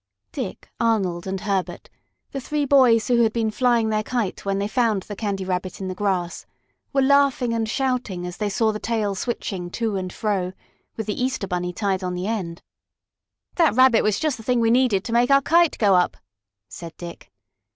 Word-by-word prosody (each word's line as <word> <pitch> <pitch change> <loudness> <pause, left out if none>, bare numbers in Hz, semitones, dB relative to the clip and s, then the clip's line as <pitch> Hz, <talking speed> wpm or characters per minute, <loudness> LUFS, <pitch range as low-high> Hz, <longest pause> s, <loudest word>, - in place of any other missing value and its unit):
Dick, - - -6
Arnold 195 -6 0
and 190 0 -3
Herbert, 195 -3 -2 0.4
the 275 - -4
three 295 +2 -1
boys 255 -5 +5
who 240 -1 +3
had 225 -1 +3
been 225 -1 -1
flying 235 -1 +2
their 215 0 +1
kite 225 -3 -3
when 195 0 -1
they 200 +1 -1
found 220 -4 +1
the 205 - -7
Candy 200 -2 -3
Rabbit 185 0 -3
in 190 -1 -4
the - - -3
grass, 185 -3 -2 0.4
were 275 -1 +2
laughing 275 -3 +3
and 225 -1 -1
shouting 250 -8 -1
as 180 0 -6
they 210 -1 -1
saw 220 +2 +1
the 215 - -5
tail 220 -3 -1
switching 190 -3 -4
to 220 +1 -2
and 185 -1 -4
fro, 190 -4 -2 0.4
with 220 - -3
the 210 +4 -2
Easter 255 -6 -1
Bunny 180 -1 -2
tied 190 0 -1
on 180 0 -2
the 180 +1 -3
end. 190 -6 -4 0.9
"That 330 - +4
Rabbit 255 -2 +6
was 210 -2 +1
just 310 -5 0
the 225 - -11
thing 245 +2 +1
needed 230 -4 +3
to 230 - -4
make 240 +1 +3
our 275 0 +6
kite 335 +4 +3
go 205 -3 +4
up," 180 -1 +2 0.5
said 165 -2 -10
Dick. 170 -1 -10
215 Hz, 195 wpm, -23 LUFS, 190-245 Hz, 0.9 s, Rabbit